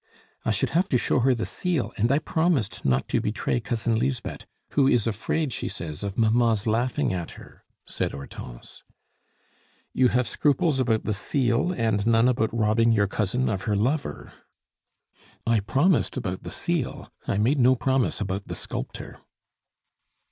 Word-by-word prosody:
"I -, -, -1 dB
should 105 Hz, -, 0 dB
have 180 Hz, +3 st, +1 dB
to 125 Hz, -, +3 dB
show 125 Hz, -, +1 dB
her 130 Hz, +1 st, +3 dB
the 115 Hz, -, -2 dB
seal, 175 Hz, -8 st, -2 dB
and 115 Hz, +5 st, +1 dB
I 140 Hz, -, +4 dB
promised 160 Hz, -, 0 dB
not 65 Hz, 0 st, +1 dB
to -, -, +1 dB
betray 110 Hz, +3 st, -1 dB
Cousin 115 Hz, -1 st, -1 dB
Lisbeth, 125 Hz, -1 st, -3 dB, 0.2 s
who 140 Hz, -2 st, +3 dB
is 120 Hz, -5 st, +3 dB
afraid, 120 Hz, +6 st, -1 dB
she -, -, -3 dB
says, 75 Hz, -3 st, -6 dB
of 100 Hz, -1 st, -4 dB
mamma's 115 Hz, -1 st, +3 dB
laughing 115 Hz, -1 st, 0 dB
at 85 Hz, -3 st, -4 dB
her," -, -, -15 dB, 0.2 s
said -, -, -2 dB
Hortense. 70 Hz, -3 st, -10 dB, 1.1 s
"You 130 Hz, -, +4 dB
have 125 Hz, 0 st, +1 dB
scruples 145 Hz, 0 st, +1 dB
about 115 Hz, -4 st, +1 dB
the 110 Hz, -, -1 dB
seal, 120 Hz, -, +1 dB
and 110 Hz, -, 0 dB
none 115 Hz, +1 st, +4 dB
about 115 Hz, -3 st, +1 dB
robbing 115 Hz, 0 st, +2 dB
your 105 Hz, -2 st, +3 dB
cousin 105 Hz, +6 st, 0 dB
of 95 Hz, -3 st, -2 dB
her 105 Hz, -, +1 dB
lover." 130 Hz, +8 st, -2 dB, 1.1 s
"I 115 Hz, -1 st, +3 dB
promised 140 Hz, -, +1 dB
about 95 Hz, -7 st, -3 dB
the -, -, -7 dB
seal 170 Hz, -7 st, -3 dB, 0.2 s
I 100 Hz, -, 0 dB
made 125 Hz, +8 st, +2 dB
no 130 Hz, +1 st, +5 dB
promise 130 Hz, +1 st, 0 dB
about 100 Hz, -1 st, -3 dB
the -, -, -5 dB
sculptor." -, -, -6 dB
115 Hz, 160 wpm, -25 LUFS, 105-130 Hz, 1.1 s, no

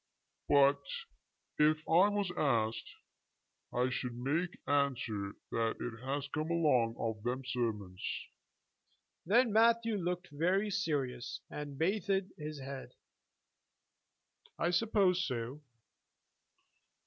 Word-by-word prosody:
But 140 Hz, 0 st, +5 dB, 0.8 s
if 155 Hz, +1 st, +5 dB
I 180 Hz, +5 st, +6 dB
was 205 Hz, -3 st, -1 dB
asked 115 Hz, -6 st, 0 dB, 0.8 s
I 125 Hz, +1 st, +1 dB
should 125 Hz, -1 st, -3 dB
make 160 Hz, +8 st, -1 dB
answer 125 Hz, -8 st, 0 dB, 0.2 s
that 115 Hz, -1 st, 0 dB
it 115 Hz, 0 st, -5 dB
has 140 Hz, +1 st, -2 dB
come 155 Hz, +2 st, -3 dB
along 135 Hz, -9 st, +3 dB
of 110 Hz, -2 st, -2 dB
them 125 Hz, +3 st, -2 dB
sermons." 110 Hz, -7 st, -2 dB, 1.3 s
Then 230 Hz, +3 st, +4 dB
Matthew 230 Hz, 0 st, +4 dB
looked 180 Hz, -1 st, -2 dB
very 185 Hz, +8 st, +1 dB
serious, 135 Hz, -9 st, -2 dB
and 145 Hz, -2 st, -6 dB
bathed 190 Hz, +2 st, 0 dB
his 150 Hz, -1 st, -6 dB
head. 135 Hz, 0 st, -7 dB, 1.6 s
"I 170 Hz, -, +1 dB
suppose 185 Hz, -2 st, +3 dB
so." 125 Hz, +1 st, -3 dB
145 Hz, 100 wpm, -33 LUFS, 125-180 Hz, 1.6 s, I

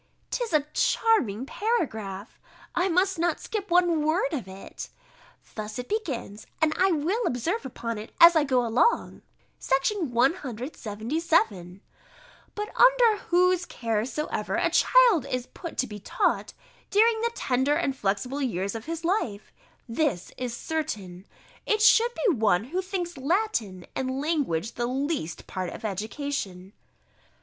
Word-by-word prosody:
'Tis 480 Hz, -2 st, -2 dB
a 300 Hz, -2 st, +2 dB
charming 425 Hz, -, +2 dB
paragraph; 220 Hz, -, -3 dB, 0.3 s
I 360 Hz, +2 st, +1 dB
must 370 Hz, +1 st, +2 dB
not 340 Hz, -1 st, +1 dB
skip 415 Hz, -3 st, -5 dB
one 345 Hz, -3 st, +3 dB
word 310 Hz, -1 st, +1 dB
of 255 Hz, -10 st, -3 dB
it. 190 Hz, +1 st, -9 dB, 0.6 s
Thus 215 Hz, +1 st, -6 dB
it 250 Hz, -, -5 dB
begins, 265 Hz, -, -4 dB
and 315 Hz, -1 st, +2 dB
I 380 Hz, 0 st, +3 dB
will 350 Hz, +9 st, 0 dB
observe 325 Hz, -, -2 dB
upon 230 Hz, -3 st, -5 dB
it 215 Hz, -, -9 dB
as 340 Hz, 0 st, +9 dB
I 315 Hz, -, +4 dB
go 255 Hz, -4 st, +1 dB
along. 245 Hz, -, +1 dB, 0.4 s
§ 315 Hz, +7 st, +1 dB
177: 240 Hz, -, -1 dB, 0.7 s
"But 420 Hz, 0 st, -5 dB
under -, -, +5 dB
whose 360 Hz, 0 st, +3 dB
care 225 Hz, -2 st, -1 dB
soever 300 Hz, +4 st, -3 dB
a -, -, +1 dB
child 470 Hz, -, +5 dB
is 250 Hz, -2 st, -2 dB
put 335 Hz, +4 st, -9 dB
to -, -, +1 dB
be 210 Hz, -3 st, -8 dB
taught, 205 Hz, -, -1 dB, 0.4 s
during 445 Hz, +2 st, +4 dB
the 470 Hz, 0 st, 0 dB
tender 265 Hz, +3 st, +1 dB
and 285 Hz, -4 st, 0 dB
flexible 250 Hz, +6 st, -2 dB
years 200 Hz, -7 st, -1 dB
of 225 Hz, -1 st, -6 dB
his 330 Hz, 0 st, -5 dB
life, 245 Hz, -, -1 dB, 0.3 s
this 230 Hz, -, -1 dB
is 245 Hz, -2 st, -4 dB
certain, 200 Hz, -, -4 dB, 0.4 s
it 430 Hz, -, +2 dB
should 455 Hz, +2 st, +6 dB
be 405 Hz, -, +5 dB
one 215 Hz, -7 st, +2 dB
who 340 Hz, +10 st, -2 dB
thinks 355 Hz, -5 st, -4 dB
Latin 265 Hz, -, -1 dB
and 260 Hz, 0 st, -2 dB
language 275 Hz, -, -1 dB
the 240 Hz, 0 st, -2 dB
least 265 Hz, -, -3 dB
part 185 Hz, -1 st, -4 dB
of -, -, -8 dB
education." 205 Hz, -2 st, -4 dB
280 Hz, 140 wpm, -26 LUFS, 220-360 Hz, 0.7 s, as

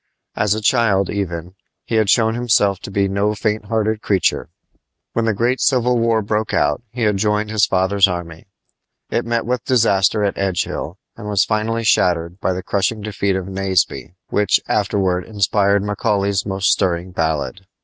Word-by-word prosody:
As 105 Hz, 0 st, +1 dB
a 110 Hz, -, -4 dB
child, 105 Hz, -5 st, +2 dB
even, 90 Hz, -3 st, -4 dB, 0.3 s
he -, -, -6 dB
had 110 Hz, -2 st, +2 dB
shown 110 Hz, 0 st, +3 dB
himself 105 Hz, -5 st, +2 dB
to -, -, -8 dB
be 100 Hz, 0 st, 0 dB
no 100 Hz, +2 st, 0 dB
faint 105 Hz, 0 st, -2 dB
hearted 110 Hz, 0 st, -1 dB
creature. 100 Hz, -3 st, 0 dB, 0.6 s
When 115 Hz, -, 0 dB
the 110 Hz, -, +1 dB
great 120 Hz, +5 st, 0 dB
Civil 125 Hz, -2 st, +2 dB
War 115 Hz, -1 st, +1 dB
broke 105 Hz, +1 st, -1 dB
out 75 Hz, +6 st, +1 dB
he 120 Hz, +2 st, -4 dB
had 105 Hz, -2 st, +2 dB
joined 105 Hz, +1 st, 0 dB
his 110 Hz, -2 st, +3 dB
father's 95 Hz, +1 st, +3 dB
army. 85 Hz, -2 st, -6 dB, 0.6 s
It 120 Hz, -, 0 dB
met 115 Hz, -1 st, 0 dB
with 125 Hz, 0 st, -2 dB
disaster 105 Hz, -4 st, +2 dB
at 100 Hz, -, -1 dB
Edgehill, 90 Hz, -3 st, -2 dB, 0.2 s
and 105 Hz, -2 st, -9 dB
was 100 Hz, -2 st, +2 dB
finally 115 Hz, +2 st, -1 dB
shattered 90 Hz, -4 st, +1 dB
by 95 Hz, -, 0 dB
the 90 Hz, 0 st, -5 dB
crushing 100 Hz, +3 st, -1 dB
defeat 100 Hz, -2 st, -1 dB
of 95 Hz, -1 st, -3 dB
Naseby, 95 Hz, -3 st, -1 dB
which 105 Hz, -1 st, +2 dB
afterward 95 Hz, -3 st, 0 dB
inspired 100 Hz, -1 st, +1 dB
Macaulay's 100 Hz, -1 st, -1 dB
most 95 Hz, 0 st, +1 dB
stirring 90 Hz, -1 st, 0 dB
ballad. 80 Hz, +1 st, -2 dB
100 Hz, 170 wpm, -19 LUFS, 95-110 Hz, 0.6 s, shown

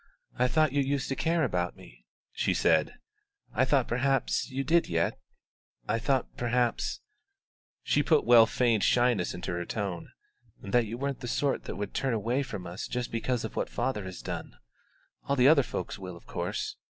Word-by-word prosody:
"I 125 Hz, -, +4 dB
thought 155 Hz, +2 st, +3 dB
you 145 Hz, -, +3 dB
used 135 Hz, 0 st, -1 dB
to 135 Hz, -, -1 dB
care 165 Hz, +3 st, +1 dB
about 90 Hz, -, -1 dB
me," -, -, -16 dB, 0.2 s
she -, -, 0 dB
said; 80 Hz, -, +2 dB, 0.6 s
"I 130 Hz, -, +3 dB
thought 135 Hz, -2 st, +2 dB
perhaps 135 Hz, +3 st, 0 dB
you 135 Hz, +1 st, -2 dB
did 170 Hz, +3 st, +3 dB
yet; 85 Hz, -1 st, 0 dB, 0.7 s
I 115 Hz, +2 st, +1 dB
thought 135 Hz, +2 st, 0 dB
perhaps" 120 Hz, 0 st, 0 dB, 0.8 s
she 145 Hz, -, +2 dB
put 150 Hz, +1 st, +3 dB
well 115 Hz, -1 st, +7 dB
feigned 115 Hz, -4 st, +2 dB
shyness 120 Hz, -8 st, +2 dB
into 90 Hz, -, -4 dB
her 85 Hz, 0 st, -2 dB
tone 95 Hz, -2 st, -4 dB, 0.5 s
"that 115 Hz, +3 st, +1 dB
you 115 Hz, +3 st, -5 dB
weren't 140 Hz, +1 st, -3 dB
the 120 Hz, -, -6 dB
sort 135 Hz, +2 st, 0 dB
that -, -, -5 dB
would 105 Hz, -1 st, -5 dB
turn 130 Hz, -3 st, 0 dB
away 120 Hz, +5 st, 0 dB
from 105 Hz, -9 st, -6 dB
us 90 Hz, +4 st, -6 dB
just 125 Hz, -1 st, -3 dB
because 115 Hz, +1 st, -1 dB
of -, -, -7 dB
what -, -, -1 dB
father 105 Hz, -7 st, -2 dB
has 95 Hz, -1 st, -8 dB
done. -, -, -6 dB, 0.7 s
All 140 Hz, -, +1 dB
the 130 Hz, -1 st, +5 dB
other 150 Hz, -1 st, +7 dB
folks 110 Hz, -3 st, -5 dB
will, 90 Hz, -2 st, -7 dB
of -, -, -18 dB
course. -, -, -3 dB
120 Hz, 185 wpm, -29 LUFS, 100-135 Hz, 0.8 s, well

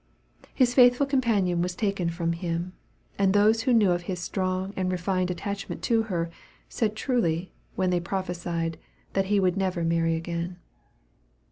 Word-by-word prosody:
His 250 Hz, -3 st, +3 dB
faithful 245 Hz, +2 st, +6 dB
companion 220 Hz, -10 st, +1 dB
was 180 Hz, 0 st, -2 dB
taken 195 Hz, -5 st, 0 dB
from 170 Hz, 0 st, -1 dB
him, 170 Hz, +1 st, -3 dB, 0.5 s
and 195 Hz, -1 st, +3 dB
those 215 Hz, +2 st, +4 dB
who 255 Hz, -, +1 dB
knew 215 Hz, -6 st, +5 dB
of 175 Hz, 0 st, 0 dB
his 180 Hz, +1 st, -4 dB
strong 185 Hz, +1 st, -2 dB
and 185 Hz, -1 st, -1 dB
refined 185 Hz, 0 st, 0 dB
attachment 200 Hz, +3 st, -4 dB
to 230 Hz, -1 st, +3 dB
her, 170 Hz, -3 st, -1 dB, 0.4 s
said 215 Hz, -2 st, -1 dB
truly, 190 Hz, -8 st, 0 dB, 0.2 s
when 185 Hz, -1 st, +1 dB
they 180 Hz, -, +2 dB
prophesied, 170 Hz, -3 st, -3 dB, 0.3 s
that 195 Hz, 0 st, +1 dB
he 205 Hz, +1 st, +2 dB
would 185 Hz, -2 st, +2 dB
never 185 Hz, -3 st, 0 dB
marry 165 Hz, 0 st, +1 dB
again. 170 Hz, +2 st, -4 dB
185 Hz, 155 wpm, -26 LUFS, 170-205 Hz, 0.5 s, faithful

